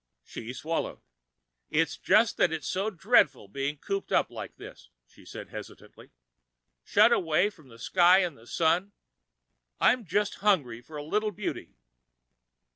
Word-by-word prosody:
She 115 - -8
swallowed. 160 +5 -3 0.7
"It's 160 0 +1
just 225 0 +3
that 175 - +3
it's 160 -1 -4
so 195 +3 -1
dreadful 170 - +2
being 140 +7 -3
cooped 195 +6 -4
up - - +2
like - - -8
this," - - -13 0.2
she - - -20
said - - -9
hesitatingly, - - -11 0.7
"shut - - +4
away 175 +5 +2
from 155 -8 -20
the 115 -2 -15
sky 180 +8 +4
and 170 -5 -3
the 115 -1 -18
Sun. 175 +7 +1 0.9
I'm 250 - +3
just 205 +2 -1
hungry 145 - +1
for 150 +4 -11
a 145 - -5
little 210 +8 0
beauty." 205 0 -6
165 Hz, 145 wpm, -28 LUFS, 145-195 Hz, 0.9 s, shut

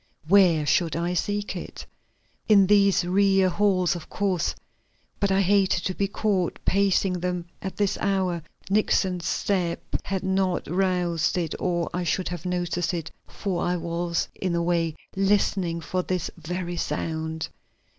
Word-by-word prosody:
Where 175 -5 +5
should 165 +1 +2
I 170 +2 -1
seek 205 +4 -2
it? - - -7 0.6
In 200 -2 +7
these 200 -2 +4
rear 195 +1 +3
halls, 185 -2 +2
of 170 - -8
course, 185 -4 0 0.6
but 200 -1 +1
I 190 +1 +3
hated 195 -2 +3
to 185 - -1
be 200 +2 0
caught 195 -3 0
pacing 195 -2 +2
them 180 -1 -2 0.2
at 190 - -5
this 205 -2 0
hour. 190 -4 0 0.3
Nixon's 190 -3 +1
step 180 -4 -1 0.2
had 195 -1 -2
not 190 -1 0
roused 180 -2 +1
it 165 -3 -1
or 175 -2 0
I 180 - -1
should 180 +2 -1
have 175 0 -5
noticed 175 -1 -1
it, 165 -2 -5 0.2
for 185 -4 -3
I 180 - +1
was, 170 0 -2
in 185 -2 -2
a 170 - +1
way, 170 -2 0 0.2
listening 195 -3 +1
for 185 +3 -1
this 180 -2 -2
very 175 +1 -4
sound. 160 -1 -3
180 Hz, 150 wpm, -25 LUFS, 170-195 Hz, 0.6 s, In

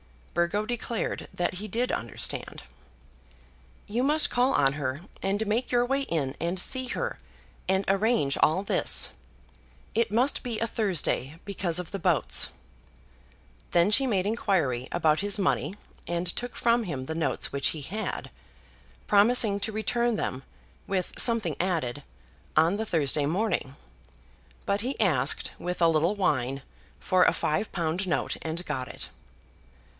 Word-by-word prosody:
Burgo 175 +5 +1
declared 235 -1 -3
that 175 0 -1
he 205 +4 -5
did 235 +5 0
understand. 115 - -4 1.2
"You 230 +4 -1
must 300 +4 +3
call 250 +2 +3
on 135 -1 +3
her, 140 0 -3 0.2
and 200 +3 0
make 225 +4 -1
your 245 0 +3
way 270 +2 0
in, 150 - -2
and 175 +2 -1
see 260 +6 0
her, - - -3 0.5
and 190 +1 +1
arrange 195 - +2
all 175 +5 +3
this. - - +2 0.8
It 230 0 +2
must 250 +6 +2
be 235 -3 -3
a 230 - 0
Thursday, 175 - 0
because 185 -4 0
of 180 -2 -2
the 195 - -4
boats." 170 -4 +2 1.2
Then 175 +4 +4
she 265 +5 +5
made 195 -6 +1
inquiry 175 - 0
about 160 -3 +2
his 205 +1 +1
money, 195 0 0 0.3
and 175 +1 -1
took 240 +8 -4
from 235 -1 +2
him 140 -7 -4
the 160 - -4
notes 155 -6 0
which 140 0 0
he 155 - -2
had, 210 +10 -4 0.7
promising 210 0 +4
to 220 - -1
return 235 +2 +1
them, 130 -10 -3 0.5
with 185 -2 -1
something 230 -2 +2
added, 160 -8 -1 0.6
on 165 +5 +4
the 220 - -2
Thursday 145 -4 +2
morning; 175 -6 -1 0.9
but 200 +1 +1
he 255 +5 -3
asked, 150 - +2
with 180 0 -3
a 170 -1 +5
little 165 +5 +2
whine, 135 -8 0 0.4
for 185 -2 +3
a - - +4
five 155 +8 -1
pound 175 +2 -1
note, 175 - -1
and 165 +2 -4
got 130 0 -3
it. - - -6
190 Hz, 150 wpm, -27 LUFS, 160-220 Hz, 1.2 s, she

